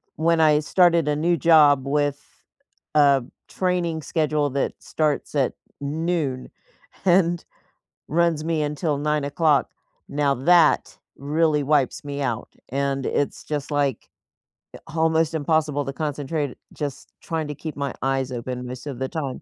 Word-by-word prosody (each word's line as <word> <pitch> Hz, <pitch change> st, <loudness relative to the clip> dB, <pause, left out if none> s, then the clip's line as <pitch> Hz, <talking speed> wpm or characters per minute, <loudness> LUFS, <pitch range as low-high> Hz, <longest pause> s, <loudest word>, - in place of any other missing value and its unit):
when 165 Hz, +1 st, +2 dB
I 155 Hz, -2 st, +5 dB
started 170 Hz, -1 st, +3 dB
a 150 Hz, -, +1 dB
new 170 Hz, +4 st, +2 dB
job 150 Hz, -4 st, +5 dB
with 145 Hz, 0 st, 0 dB, 0.8 s
a 140 Hz, -4 st, +5 dB, 0.2 s
training 175 Hz, -3 st, -1 dB
schedule 150 Hz, -2 st, 0 dB
that 140 Hz, +1 st, -1 dB
starts 150 Hz, -1 st, -2 dB
at 135 Hz, -3 st, +1 dB, 0.3 s
noon 150 Hz, -2 st, -2 dB, 0.5 s
and 175 Hz, -2 st, +3 dB, 0.6 s
runs 165 Hz, -1 st, +1 dB
me 160 Hz, -1 st, 0 dB
until 150 Hz, 0 st, -1 dB
9:00, 150 Hz, 0 st, +1 dB, 0.4 s
now 140 Hz, -1 st, +1 dB
that 170 Hz, +6 st, +4 dB, 0.2 s
really 150 Hz, +1 st, +1 dB
wipes 140 Hz, -2 st, +1 dB
me 145 Hz, 0 st, -5 dB
out, 120 Hz, -4 st, -2 dB, 0.2 s
and 135 Hz, 0 st, -1 dB
it's 145 Hz, -, -1 dB
just, 150 Hz, -2 st, -4 dB
like, 140 Hz, -5 st, -1 dB, 0.6 s
eh, -, -, -9 dB
almost 160 Hz, 0 st, +1 dB
impossible 155 Hz, -2 st, 0 dB
to 135 Hz, -, -4 dB
concentrate 145 Hz, -1 st, -3 dB, 0.2 s
just 145 Hz, -3 st, -6 dB
trying 160 Hz, -2 st, -3 dB
to 150 Hz, -, -5 dB
keep 155 Hz, +2 st, -7 dB
my 140 Hz, -2 st, -2 dB
eyes 135 Hz, -1 st, 0 dB
open 125 Hz, 0 st, -5 dB
most 125 Hz, +2 st, -8 dB
of 135 Hz, -4 st, -6 dB
the 130 Hz, -, -1 dB
time. 145 Hz, -6 st, -4 dB
150 Hz, 140 wpm, -23 LUFS, 140-160 Hz, 0.8 s, I